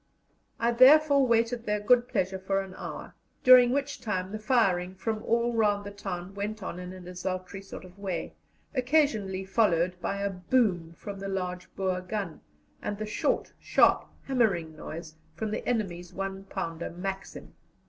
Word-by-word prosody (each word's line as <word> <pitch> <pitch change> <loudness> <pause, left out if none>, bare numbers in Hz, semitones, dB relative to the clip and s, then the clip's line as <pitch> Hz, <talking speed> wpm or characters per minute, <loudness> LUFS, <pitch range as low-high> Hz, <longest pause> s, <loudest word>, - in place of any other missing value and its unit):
I 235 +1 +2
therefore 280 +2 +7
waited 230 0 +1
their 210 0 +1
good 245 +3 +4
pleasure 190 -3 -1
for 195 +1 0
an 190 -1 -8
hour, - - -7 0.3
during 250 -1 +9
which 280 +2 -1
time 185 -4 -2
the 215 - -4
firing 195 -6 +2
from 220 +2 -2
all 235 +1 +1
round 205 -3 +2
the 205 - -6
town 195 -2 -6
went 205 +1 -4
on 180 -1 -5
in 180 0 -7
a 185 - -9
desultory 185 +1 -5
sort 195 - -9
of 185 +2 -15
way, 185 -5 -3 0.4
occasionally 250 -9 +1
followed 180 -3 +2
by 200 +3 -2
a 200 - 0
boom 180 -3 +1
from 195 +3 -8
a 195 - -4
large 180 -2 -4
Boer 185 -1 -1
gun, 185 -2 -4 0.4
and 210 -1 -3
the 215 - -3
short, 210 - -1
sharp, - - +4 0.2
hammering 195 -12 +1
noise 160 +1 -8 0.2
from 210 +5 -3
the - - -3
enemy's 180 -7 -2
one 195 0 -4
pounder 165 -3 -4
Maxim. 195 +3 -6
195 Hz, 165 wpm, -28 LUFS, 180-230 Hz, 0.4 s, during